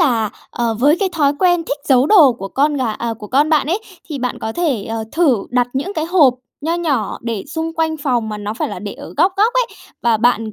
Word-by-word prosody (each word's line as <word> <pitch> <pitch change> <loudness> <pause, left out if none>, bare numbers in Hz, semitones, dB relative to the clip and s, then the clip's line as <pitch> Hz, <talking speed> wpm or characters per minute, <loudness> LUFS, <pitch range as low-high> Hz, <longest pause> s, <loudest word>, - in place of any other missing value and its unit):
là, 235 -10 +2 0.2
ờ, 235 -2 -1
với 290 +6 +4
cái 395 - +2
thói 290 -4 +2
quen 350 -1 +3
thích 285 -2 -3
giấu 265 0 +5
đồ 315 -11 +7
của 195 -4 -7
con 290 +7 +1
gà 250 -5 -1
à, 230 +1 -3
của 210 - -8
con 285 +7 +2
bạn 305 -3 +3
ấy, 345 +6 0 0.3
thì 295 -4 -4
bạn 250 0 -3
có 220 - -4
thể, 275 -9 -1
ờ, 225 0 -4
thử 310 -6 +3
đặt 245 -1 +2
những 285 +9 -2
cái 315 - -1
hộp 320 -7 +4 0.3
nho 320 +3 -1
nhỏ 290 - -1
để 230 -4 -3
xung 320 +2 -3
quanh 320 -1 0
phòng 245 -5 0
mà 210 -1 -5
nó 205 +1 -4
phải - - -2
là - - -6
để - - -6
ở - - -11
góc 370 - +3
góc 430 +4 +3
ấy. - - +2 0.4
Và 235 -2 +3
bạn, 225 -1 +1
275 Hz, 250 wpm, -18 LUFS, 230-325 Hz, 0.4 s, đồ